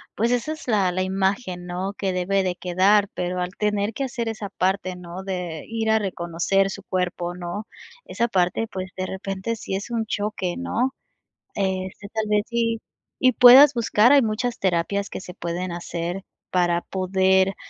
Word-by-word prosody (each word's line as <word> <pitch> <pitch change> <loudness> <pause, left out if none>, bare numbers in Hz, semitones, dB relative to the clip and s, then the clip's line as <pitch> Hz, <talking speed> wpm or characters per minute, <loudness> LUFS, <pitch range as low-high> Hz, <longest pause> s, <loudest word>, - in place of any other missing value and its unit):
Pues, 230 +3 +1
esa 245 +6 0
es 315 - -11
la 200 -6 +2
la 185 +1 -1
imagen, 190 0 -1
¿no?, 185 +3 -3
que 190 -2 -1
debe 190 +2 +1
de 180 -1 -1
quedar, 190 +3 +3
pero 180 0 -2
al 180 0 -2
tener 210 0 0
que 275 - -2
hacer 240 -2 -3
esa 215 -2 -5
parte, 185 -1 -1
¿no?, 180 +1 -8
de 180 -5 -4
ir 225 -1 -1
a 220 - +4
reconocer 190 0 0
su 200 0 -7
cuerpo, 175 -2 -2
¿no? 180 +4 -5 0.4
Esa 235 - -1
parte, 185 +2 +1
pues, 185 -1 -5
de 185 - -2
repente, 195 +4 -4
sí 195 - -4
es 195 +4 -4
un 230 -1 -1
choque, 205 -4 -2
¿no?, 260 0 -1 0.6
este, 190 +1 -2
tal 220 0 -2
vez 210 0 +3
sí, 230 -1 0 0.4
y 255 - +4
puedas 260 +4 +9
buscar, 235 -1 +4
hay 285 -1 +7
muchas 230 +2 -1
terapias 190 +2 0
que - - -6
se 180 - -9
pueden 175 0 -4
hacer 175 +2 -4 0.3
para 175 -1 +2
poder, 190 +1 +2
195 Hz, 175 wpm, -23 LUFS, 180-220 Hz, 0.6 s, puedas